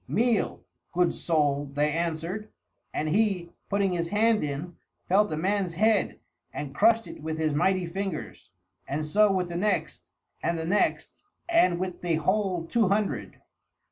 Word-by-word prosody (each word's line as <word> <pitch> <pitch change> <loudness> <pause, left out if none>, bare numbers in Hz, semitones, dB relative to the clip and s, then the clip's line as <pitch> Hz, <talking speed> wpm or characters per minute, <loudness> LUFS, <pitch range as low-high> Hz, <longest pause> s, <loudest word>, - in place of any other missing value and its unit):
"Meal, 230 +1 +1 0.3
good 180 0 +2
soul," 145 -3 0
they 150 +1 +2
answered; 170 +6 -3 0.4
and 155 - -2
he, 190 -2 +1 0.2
putting 200 -1 +1
his 170 -1 -1
hand 215 +2 +2
in, 150 +4 -4 0.3
felt 205 +2 +3
a 155 - -2
man's 190 0 0
head 215 +3 +2 0.3
and 140 -2 -6
crushed 225 +7 +4
it - - -10
with 160 +1 -3
his 155 -2 0
mighty 185 +4 +2
fingers, 185 - -5 0.4
and 150 +3 -2
so 205 +6 +4
with 185 -2 0
the 170 - -6
next 185 -4 -1 0.3
and 170 0 0
the 160 - -3
next 200 +5 0 0.2
and 185 - +4
with 185 -1 -4
the 175 -2 +1
whole 185 +1 0
two 225 +4 +2
hundred. 195 - -1
180 Hz, 155 wpm, -27 LUFS, 160-205 Hz, 0.4 s, crushed